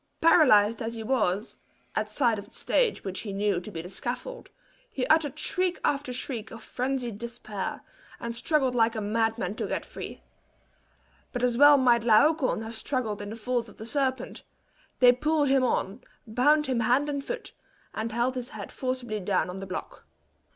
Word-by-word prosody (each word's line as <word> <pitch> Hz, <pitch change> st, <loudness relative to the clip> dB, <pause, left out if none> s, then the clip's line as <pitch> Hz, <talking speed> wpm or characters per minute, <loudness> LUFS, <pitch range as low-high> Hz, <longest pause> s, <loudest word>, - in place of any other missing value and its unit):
Paralyzed 225 Hz, -10 st, +5 dB
as 230 Hz, +1 st, -3 dB
he 225 Hz, -, -5 dB
was, 215 Hz, -4 st, 0 dB, 0.4 s
at -, -, -1 dB
sight 235 Hz, -6 st, +2 dB
of 200 Hz, -, -9 dB
the -, -, -20 dB
stage 480 Hz, -3 st, +1 dB
which 190 Hz, -1 st, -4 dB
he 210 Hz, -, -5 dB
knew 195 Hz, -2 st, 0 dB
to 200 Hz, -, -8 dB
be 165 Hz, -5 st, -6 dB
the -, -, -7 dB
scaffold, 255 Hz, -, -5 dB, 0.4 s
he 260 Hz, -, -2 dB
uttered 305 Hz, -1 st, +2 dB
shriek 365 Hz, +1 st, -1 dB
after 280 Hz, -2 st, 0 dB
shriek 245 Hz, -3 st, -4 dB
of 230 Hz, -, -10 dB
frenzied 250 Hz, -4 st, -3 dB
despair, 230 Hz, -4 st, -5 dB, 0.4 s
and 235 Hz, 0 st, -5 dB
struggled 265 Hz, +1 st, +1 dB
like 230 Hz, -1 st, +2 dB
a -, -, -1 dB
madman 220 Hz, -1 st, 0 dB
to -, -, -3 dB
get -, -, -3 dB
free. -, -, -8 dB, 1.1 s
But 245 Hz, -1 st, -3 dB
as 245 Hz, -1 st, +2 dB
well 290 Hz, +3 st, +8 dB
might 240 Hz, -3 st, +4 dB
Laocoon 255 Hz, +2 st, +3 dB
have 225 Hz, +1 st, -7 dB
struggled 220 Hz, -3 st, -2 dB
in 205 Hz, -, -6 dB
the 220 Hz, -, -6 dB
folds 235 Hz, 0 st, -2 dB
of -, -, -16 dB
the 220 Hz, -, -8 dB
serpent; 260 Hz, +1 st, -2 dB, 0.6 s
they 250 Hz, -1 st, +9 dB
pulled 295 Hz, +3 st, +1 dB
him 270 Hz, -1 st, +4 dB
on, 235 Hz, -2 st, -1 dB, 0.2 s
bound 290 Hz, +7 st, +3 dB
him 255 Hz, -4 st, 0 dB
hand 245 Hz, +6 st, +2 dB
and 280 Hz, -1 st, -2 dB
foot, -, -, -5 dB, 0.4 s
and 225 Hz, +1 st, -3 dB
held 240 Hz, +3 st, 0 dB
his 250 Hz, -1 st, -5 dB
head 210 Hz, -2 st, -8 dB
forcibly 255 Hz, -4 st, -3 dB
down 185 Hz, -1 st, 0 dB
on 185 Hz, -, -7 dB
the 195 Hz, 0 st, -6 dB
block. 185 Hz, -, -7 dB
240 Hz, 185 wpm, -27 LUFS, 215-270 Hz, 1.1 s, they